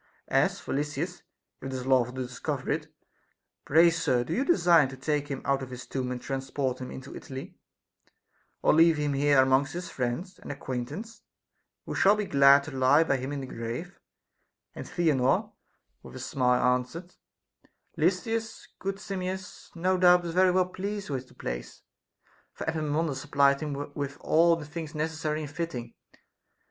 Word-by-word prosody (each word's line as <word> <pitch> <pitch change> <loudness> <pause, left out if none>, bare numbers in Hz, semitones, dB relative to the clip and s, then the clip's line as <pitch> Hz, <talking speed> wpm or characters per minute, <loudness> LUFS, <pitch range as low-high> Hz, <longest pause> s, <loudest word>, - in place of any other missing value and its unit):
As - - +2
for - - -5
Lysis 150 +5 -3 0.4
(if - - -5
it 135 - -5
is 130 -1 -4
lawful 130 -2 +2
to 130 - -2
discover 125 - -4
it), - - -2 0.7
pray, 165 +3 +6
sir, 130 -7 +1
do 140 - -4
you 255 - +1
design 175 - +5
to 130 0 -9
take 145 +2 -1
him 135 -2 -5
out 140 0 +1
of 130 - -6
his 125 -1 -8
tomb 130 -2 -3
and 125 - -3
transport 135 0 -3
him 125 - -5
into 130 +1 -9
Italy, 135 0 -8 1.1
or - - +5
leave 165 0 +5
him 145 -1 0
here 140 0 +4
amongst 130 +2 +3
his 175 -1 -5
friends 130 +10 -3
and - - -7
acquaintance, 145 - -6 0.6
who - - -5
shall 200 +2 +5
be 210 -1 -2
glad 140 -3 +6
to 160 - -8
lie 135 +3 +4
by 140 -4 +1
him 130 +2 -5
in 145 -1 -3
the - - -5
grave 120 +9 -6 0.4
\ - - -51
And - - -8
Theanor 155 -8 +1 0.5
with - - -12
a - - -7
smile 125 -1 +2
answered: 165 +8 -8 0.8
Lysis, 225 -1 -1
good 195 0 -2
Simmias, 190 -2 -5
no 185 +2 +1
doubt 180 -1 +6
is 165 - -4
very 185 +1 +5
well 185 0 +3
pleased 200 -1 -4
with 130 -2 -3
the - - -20
place, - - -6 0.7
for - - -7
Epaminondas 155 -2 -1
supplied 140 -1 +3
him 145 -1 -4
with 140 -1 -4
all 165 +1 +4
things 155 +1 -7
necessary 155 0 -2
and 145 - -7
fitting. 145 -8 -5
145 Hz, 170 wpm, -28 LUFS, 130-170 Hz, 1.1 s, pray